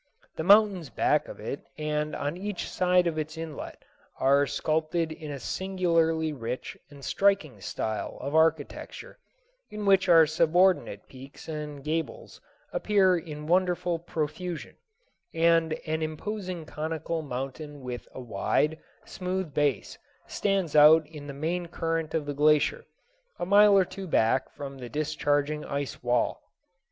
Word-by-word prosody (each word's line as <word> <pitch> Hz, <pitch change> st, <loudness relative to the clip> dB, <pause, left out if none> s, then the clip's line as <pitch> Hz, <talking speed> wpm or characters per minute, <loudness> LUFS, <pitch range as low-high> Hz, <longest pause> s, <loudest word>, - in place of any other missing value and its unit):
The 160 Hz, -, -3 dB
mountains 195 Hz, -4 st, +5 dB
back -, -, +1 dB
of -, -, -9 dB
it -, -, -5 dB
and 150 Hz, 0 st, -2 dB
on 145 Hz, +3 st, -3 dB
each 200 Hz, +1 st, -4 dB
side 180 Hz, -1 st, +2 dB
of 160 Hz, -2 st, -1 dB
its 155 Hz, +1 st, -5 dB
inlet 160 Hz, -3 st, -7 dB, 0.3 s
are 140 Hz, +1 st, +4 dB
sculptured 160 Hz, +1 st, -1 dB
in 155 Hz, -1 st, -8 dB
a 145 Hz, -, -4 dB
singularly 165 Hz, -1 st, 0 dB
rich 125 Hz, -1 st, -5 dB
and 140 Hz, -2 st, -12 dB
striking 195 Hz, -8 st, +1 dB
style 110 Hz, -1 st, -4 dB
of 140 Hz, +2 st, -5 dB
architecture, 160 Hz, -2 st, 0 dB, 0.5 s
in 210 Hz, -1 st, -5 dB
which 195 Hz, -2 st, +4 dB, 0.2 s
subordinate 160 Hz, -, +2 dB
peaks 135 Hz, +1 st, -13 dB
and 150 Hz, -3 st, -6 dB
gables 165 Hz, -, -4 dB, 0.3 s
appear 200 Hz, -, +3 dB
in 150 Hz, -3 st, -6 dB
wonderful 175 Hz, 0 st, +1 dB
profusion, 165 Hz, +1 st, -4 dB, 0.6 s
and 165 Hz, -1 st, +3 dB
an 160 Hz, 0 st, -2 dB
imposing 180 Hz, +2 st, -4 dB
conical 160 Hz, +1 st, -3 dB
mountain 140 Hz, +2 st, -6 dB
with 125 Hz, -1 st, -6 dB
a -, -, -9 dB
wide, 130 Hz, +7 st, 0 dB, 0.3 s
smooth 185 Hz, -3 st, -4 dB
base 145 Hz, -5 st, 0 dB, 0.3 s
stands 195 Hz, -6 st, -1 dB
out 155 Hz, +2 st, +8 dB
in 150 Hz, -1 st, -10 dB
the -, -, -5 dB
main 165 Hz, +5 st, -3 dB
current 165 Hz, -1 st, -2 dB
of 155 Hz, -2 st, -1 dB
the 145 Hz, -, -3 dB
glacier, 150 Hz, +1 st, +3 dB, 0.5 s
a -, -, -3 dB
mile 200 Hz, +1 st, +6 dB
or 190 Hz, -, +4 dB
two 195 Hz, +1 st, -8 dB
back 130 Hz, -4 st, +2 dB
from 140 Hz, -1 st, -8 dB
the 125 Hz, -1 st, -7 dB
discharging 150 Hz, 0 st, 0 dB
ice 140 Hz, -3 st, -4 dB
wall. 120 Hz, -1 st, 0 dB
155 Hz, 140 wpm, -27 LUFS, 145-180 Hz, 0.6 s, out